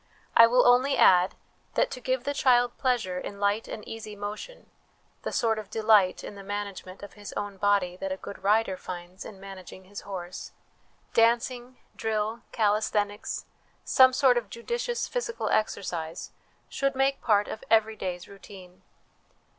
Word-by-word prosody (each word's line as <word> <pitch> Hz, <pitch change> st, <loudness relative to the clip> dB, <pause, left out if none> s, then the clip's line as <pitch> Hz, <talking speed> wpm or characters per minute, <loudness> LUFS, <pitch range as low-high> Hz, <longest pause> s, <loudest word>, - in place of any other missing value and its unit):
I 230 Hz, -, +9 dB
will 250 Hz, +2 st, +4 dB
only 255 Hz, +3 st, +4 dB
add, 180 Hz, 0 st, +5 dB, 0.4 s
that -, -, +2 dB
to 250 Hz, -, -6 dB
give 255 Hz, 0 st, -1 dB
the 285 Hz, -, -1 dB
child 245 Hz, -3 st, +3 dB
pleasure 230 Hz, -9 st, 0 dB
in 200 Hz, +2 st, -7 dB
light 205 Hz, +2 st, +1 dB
and 215 Hz, -, -7 dB
easy 215 Hz, -2 st, -7 dB
motion 210 Hz, -, -7 dB, 0.5 s
the -, -, -4 dB
sort 225 Hz, -2 st, +1 dB
of 210 Hz, -2 st, -9 dB
delight 215 Hz, -4 st, +3 dB
in -, -, -7 dB
the 200 Hz, -, -10 dB
manage 205 Hz, 0 st, -5 dB
ment 185 Hz, +2 st, -11 dB
of 205 Hz, -, -9 dB
his 205 Hz, -1 st, -9 dB
own 205 Hz, -1 st, -4 dB
body 195 Hz, -3 st, +1 dB
that 195 Hz, 0 st, -4 dB
a 190 Hz, -, -2 dB
good 195 Hz, 0 st, -9 dB
rider 205 Hz, -1 st, +2 dB
finds 180 Hz, +1 st, -8 dB
in 195 Hz, -, -10 dB
managing 190 Hz, -1 st, -10 dB
his 200 Hz, +2 st, -9 dB
horse 185 Hz, -2 st, -7 dB, 0.6 s
dancing, 240 Hz, +2 st, +2 dB, 0.2 s
drill, 220 Hz, +1 st, -2 dB
calisthenics, 210 Hz, -1 st, 0 dB, 0.4 s
some 260 Hz, -1 st, +6 dB
sort 255 Hz, -2 st, +4 dB
of 215 Hz, -4 st, -13 dB
judicious 475 Hz, -, -3 dB
physical 480 Hz, -1 st, -3 dB
exercise, 170 Hz, -6 st, -2 dB, 0.4 s
should 275 Hz, -1 st, -1 dB
make 270 Hz, +1 st, +1 dB
part 210 Hz, -3 st, +3 dB
of 220 Hz, -, -7 dB
every 220 Hz, -1 st, +3 dB
day's 180 Hz, -3 st, -5 dB
routine. 190 Hz, -2 st, -13 dB
210 Hz, 160 wpm, -27 LUFS, 195-240 Hz, 0.6 s, I